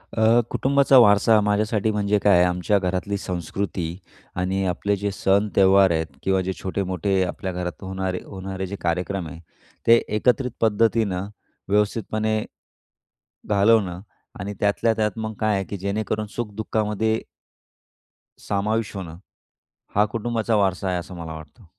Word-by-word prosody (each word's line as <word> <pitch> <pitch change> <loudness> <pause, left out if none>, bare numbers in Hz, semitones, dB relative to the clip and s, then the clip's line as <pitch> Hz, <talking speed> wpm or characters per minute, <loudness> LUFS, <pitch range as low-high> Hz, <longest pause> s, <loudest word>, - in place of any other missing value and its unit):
अ, 115 +1 +4
कुटुंबाचा 140 0 +3
वारसा 110 -1 +6
माझ्यासाठी 105 +1 +1
म्हणजे 105 0 +1
काय 100 -2 +4
आहे? 90 - +5
आमच्या 90 +3 +1
घरातली 95 +2 -2
संस्कृती 90 -1 -4 0.4
आणि 95 +1 -1
आपले 100 +3 0
जे 100 +1 -2
सण, 100 +2 +2
त्यौहार 95 -1 +5
आहेत 80 -1 0 0.2
किंवा 95 0 +2
जे 95 +1 -2
छोटे-मोठे 95 0 -1
आपल्या 95 +1 -4
घरात 90 -2 -5
होणारे 95 -1 -3
होणारे 95 -1 -5
जे 100 - -5
कार्यक्रम 90 +1 -2
आहे 80 +1 -9 0.5
ते 115 - +8 0.2
एकत्रित 125 +3 +1
पद्धतीनं 110 -3 +1 0.4
व्यवस्थितपणे 110 +1 0 1.1
घालवणं 100 -3 +3 0.4
आणि 100 +2 -4
त्यातल्या 105 +2 +2
त्यात 105 -1 +1
मग 110 0 -3
काय 110 -1 +2
आहे, 95 - -1
की 100 - -6
जेणेकरून 105 +2 -2
सुख 115 -3 -4
दुःखामध्ये 110 0 -1 1.2
समाविष्ट 105 +2 -1
होणं, 85 -4 -7 0.8
हा 105 - +5
कुटुंबाचा 115 0 -1
वारसा 95 -1 +1
आहे, 90 - 0
असं 90 +1 -8
मला 80 -2 -6
वाटतं. 80 +8 -12
100 Hz, 140 wpm, -23 LUFS, 95-110 Hz, 1.2 s, ते